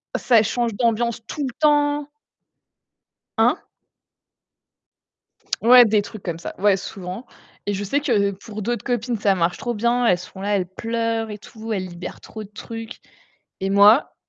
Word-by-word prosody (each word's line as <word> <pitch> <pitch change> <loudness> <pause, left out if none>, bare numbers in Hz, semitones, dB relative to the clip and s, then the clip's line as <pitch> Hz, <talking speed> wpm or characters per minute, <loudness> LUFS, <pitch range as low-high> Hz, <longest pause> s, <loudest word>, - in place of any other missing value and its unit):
ça 235 -4 +4
change 230 +1 -1
d'ambiance 235 0 0
tout 295 +4 -4
le 250 - -6
temps! 290 -1 +2 1.3
Hein? - - +4 2.0
Ouais, 245 +1 +8
des 215 -1 +3
trucs 210 0 -10
comme 170 -2 -4
ça, 170 - -7
ouais, 200 0 +4
souvent 190 +4 -7 0.4
et 205 - -1
je 200 +1 -3
sais 280 +9 0
que 210 -8 +1
pour 210 +2 -8
d'autres 240 +3 -3
copines, 245 -1 -1
ça 200 -2 +3
marche 175 0 0
trop 240 - -3
bien, 235 +2 +1
elles 180 - +4
sont 185 +2 -11
là, 205 +1 0
elles 185 -2 -1
pleurent 225 +2 -2
et 210 - -6
tout, 220 +1 -7
elles 185 -3 -2
libèrent 175 0 -8
trop 220 - -9
de 200 - -13
trucs 225 +1 -8 0.6
et 195 - -1
moi, 205 +6 +5
220 Hz, 165 wpm, -22 LUFS, 200-240 Hz, 2.0 s, Ouais